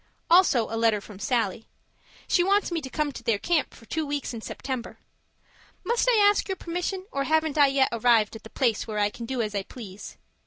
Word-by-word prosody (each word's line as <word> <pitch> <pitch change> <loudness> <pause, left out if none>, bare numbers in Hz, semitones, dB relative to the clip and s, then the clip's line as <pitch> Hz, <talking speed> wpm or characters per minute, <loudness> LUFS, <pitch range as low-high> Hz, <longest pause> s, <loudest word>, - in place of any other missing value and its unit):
Also 335 -10 +5
a 225 0 -2
letter 225 -2 +3
from 200 -1 -12
Sallie. 225 -2 -1 0.6
She 350 - +3
wants 400 +1 +2
me 335 -2 -1
to 265 - -7
come 300 +2 -1
to - - -9
their 225 -3 +1
camp 325 +7 0
for 230 - -16
two 315 +7 -2
weeks 285 -3 -3
in 230 - -6
September. 255 +1 -5 0.9
Must 475 +1 +1
I 475 - +4
ask 410 - +2
your 385 - -1
permission, 360 +2 -4
or 275 0 -1
haven't 315 -1 +1
I 290 -2 +6
yet 270 -1 +2
arrived 230 -2 +3
at 220 - -9
the 220 - -12
place 235 -4 0
where 215 -1 -4
I 205 0 +2
can 230 +1 -8
do 255 -2 -1
as 210 -1 -4
I 200 - -1
please? 200 -1 -10
260 Hz, 220 wpm, -26 LUFS, 225-315 Hz, 0.9 s, I